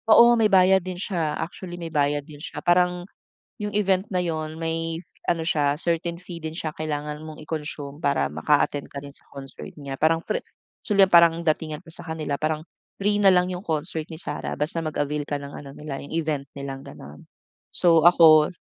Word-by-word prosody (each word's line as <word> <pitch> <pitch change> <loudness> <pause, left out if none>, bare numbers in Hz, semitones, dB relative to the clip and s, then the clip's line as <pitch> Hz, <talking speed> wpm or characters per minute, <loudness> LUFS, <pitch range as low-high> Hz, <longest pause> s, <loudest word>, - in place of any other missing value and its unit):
Oo, 235 +2 +8
may 225 -2 +3
bayad 190 0 +5
din 185 0 -6
siya. 170 -5 -2
Actually 175 +1 -6
may 165 -2 -7
bayad 145 -1 +1
din 150 -2 -12
siya. - - -8
Parang 180 0 +3 0.5
yung 210 -1 -4
event 195 -1 +2
na 180 - +2
'yon 155 -2 -3
may 165 0 -2 0.2
ano 170 -1 +1
siya 145 -3 +1
certain 170 0 -1
fee 175 -2 -8
din 160 0 -4
siya 160 -1 -3
kailangan 150 -1 -3
mong 155 -1 -9
i-consume 150 -2 -5
para 140 - +1
maka-attend 140 - +1
ka 140 - -5
din 140 - -9
sa - - -18
concert 135 -1 -8
niya. 140 -2 -6
Parang 165 +1 +3
free - - -1 0.5
actually 200 -3 +4
parang 170 -1 +6
datingan 155 -1 -1
ko 175 - -20
sa 175 +1 -3
kanila 155 -3 -3
parang 155 +1 -1 0.4
free 205 +1 +2
na 195 -2 +6
lang 180 0 +3
'yong 180 +1 -5
concert 160 0 -2
ni 160 - -8
Sarah 150 -5 -4
basta 150 +3 -2
mag-avail 150 -1 -2
ka 145 - -3
ng 140 0 -8
ano 140 - -9
nila 150 -2 -6
yung 140 - -10
event 155 -4 -1
nilang 135 -1 -6
ganon. 75 +2 -11 0.5
So 165 -3 +5
ako, 160 -2 +7
160 Hz, 195 wpm, -24 LUFS, 150-175 Hz, 0.5 s, Oo